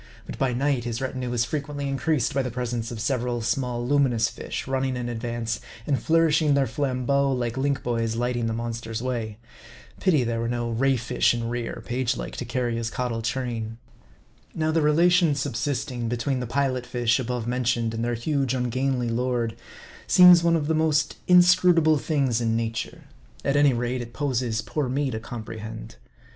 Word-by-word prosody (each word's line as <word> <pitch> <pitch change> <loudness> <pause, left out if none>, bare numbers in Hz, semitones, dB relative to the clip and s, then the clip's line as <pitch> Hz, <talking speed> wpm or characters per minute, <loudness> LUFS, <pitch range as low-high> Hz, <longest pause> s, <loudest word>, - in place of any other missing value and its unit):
But - - -8
by 135 -2 +2
night 130 -1 0
his 120 -1 -3
retinue 130 -2 -3
is 120 -1 +1
frequently 145 +2 -4
in 135 - -1
creased 145 0 0
by 135 - +1
the 130 - -3
presence 120 -1 -3
of 120 -3 -6
several 120 0 -1
small 120 0 -1
luminous 125 -5 +2
fish, - - -6
run 135 0 -1
ning 130 -1 -1
in 120 -1 -3
advance, 115 -1 -3 0.3
and 145 - +1
nourishing 160 -2 +4
their 140 -1 +3
flambeaux 135 +2 0
like 120 -3 -1
link 135 0 -1
boys 115 -2 -1
lighting 120 0 -1
the 115 - -1
monster's 115 0 -4
way. 115 -5 -3 0.6
Pity 160 -9 +3
there 115 -1 -1
were 115 - -1
no 120 -1 -2
ray 135 +3 +2
fish 120 +1 +1
in 115 -1 -3
rear, 120 -1 -4
page 125 0 -1
like, - - -6
to 125 - -4
carry 120 0 -1
his 115 -1 -2
caudal 120 -2 -2
train. 115 -2 -3 0.8
Now 160 0 0
the 165 0 +2
relation 165 +1 +4
subsisting 130 -3 -2
between 120 +3 -1
the 125 - -4
Pilot 130 0 -1
fish 120 0 +1
above 125 -2 -3
mentioned 120 -2 0
and 115 0 -3
their 120 0 0
huge 135 +1 -1
ungainly 125 0 0
lord, 120 -1 -1 0.5
seems 180 -1 +8
one 170 0 +3
of 155 -3 0
the 160 - +1
most 155 -1 +1
inscrutable 180 -3 +5
things 135 -7 0
in 115 -1 +1
nature. 115 0 -3 0.4
At 140 - +1
any 145 -2 +5
rate, 120 +1 -2
it 120 0 -8
poses 125 -6 -1
poor 130 +3 -2
me 135 +1 0
to 110 - -3
comprehend. 110 - -8
125 Hz, 180 wpm, -25 LUFS, 115-140 Hz, 0.8 s, seems